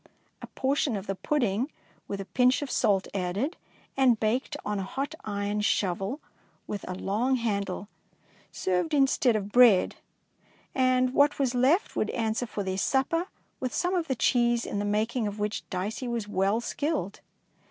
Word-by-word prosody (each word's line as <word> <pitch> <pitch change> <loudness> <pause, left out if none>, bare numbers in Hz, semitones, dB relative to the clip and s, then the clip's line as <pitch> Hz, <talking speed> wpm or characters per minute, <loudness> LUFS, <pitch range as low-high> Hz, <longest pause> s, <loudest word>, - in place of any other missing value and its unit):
A - - -7
portion 270 -2 0
of 195 -1 -4
the 195 - -2
pudding 240 +2 0 0.4
with 200 - -4
a 195 - -5
pinch 250 +6 +2
of 275 - -5
salt 195 -2 +2
added, 200 - -1 0.4
and 255 -4 +4
baked 250 +7 0
on 210 -1 -1
a - - -2
hot 275 +10 -4
iron 205 0 -2
shovel 195 - 0 0.5
with 205 -2 -5
a 185 - -3
long 220 +8 0
handle, 200 -5 -2 0.6
served 185 - 0
instead 270 -3 +3
of 205 -1 -3
bread, 240 -6 +5 0.8
and 255 -1 +2
what 285 +1 +4
was 265 -3 +1
left 265 - +2
would - - 0
answer 225 0 -1
for 205 -1 -4
their 190 0 -2
supper, 330 - +1 0.3
with 255 -1 -3
some 355 +1 0
of 345 -3 0
the 265 - 0
cheese 240 -1 +2
in 205 - -3
the 205 - -1
making 215 +3 0
of 205 0 -5
which 210 0 -3
Dicey 205 +7 -3
was 235 -3 -2
well 200 +2 +1
skilled. 260 - -2
230 Hz, 165 wpm, -28 LUFS, 200-265 Hz, 0.8 s, bread